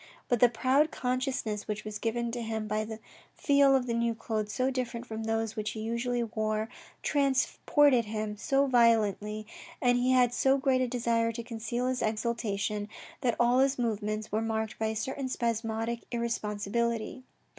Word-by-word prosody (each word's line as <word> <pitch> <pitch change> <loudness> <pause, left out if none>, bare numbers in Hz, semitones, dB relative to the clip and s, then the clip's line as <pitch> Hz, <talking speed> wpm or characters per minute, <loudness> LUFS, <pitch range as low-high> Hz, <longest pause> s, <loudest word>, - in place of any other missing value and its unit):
But 245 - +2
the 245 - +7
proud 265 +6 +2
consciousness 250 -6 -2
which 215 0 -4
was 210 0 -5
given 235 +1 -1
to 240 0 -4
him 220 -1 -3
by 215 +1 -1
the 220 0 -6 0.4
feel 280 -2 +4
of 260 -2 +1 0.3
clothes 215 -3 -2
so 255 +4 0
different 245 -2 -3
from 220 -1 -5
those 225 0 -1
which 215 -1 -3
he 220 - -6
usually 235 +2 -1
wore, 215 -1 -2 0.3
transported 275 -1 +3
him 215 0 -3
so 275 +5 +2
violently 215 -4 +2 0.3
and 245 0 +3
he 250 +1 +1
had 250 -2 +4
so 265 +2 +3
great 265 -1 +2
a 255 - +1
desire 235 -2 +1
to 235 +1 -5
conceal 235 +1 -3
his 255 0 -1
exultation, 215 -2 -1 0.3
that 245 -3 +1
all 240 +1 +4
his 270 +1 +3
movements 215 -2 -2
were 215 +2 +1
marked 220 -1 -2
by 220 - +1
a 220 - -2
certain 260 +4 -3
spasmodic 230 -1 -1
irresponsibility. 235 +1 -2
230 Hz, 165 wpm, -29 LUFS, 215-250 Hz, 0.4 s, the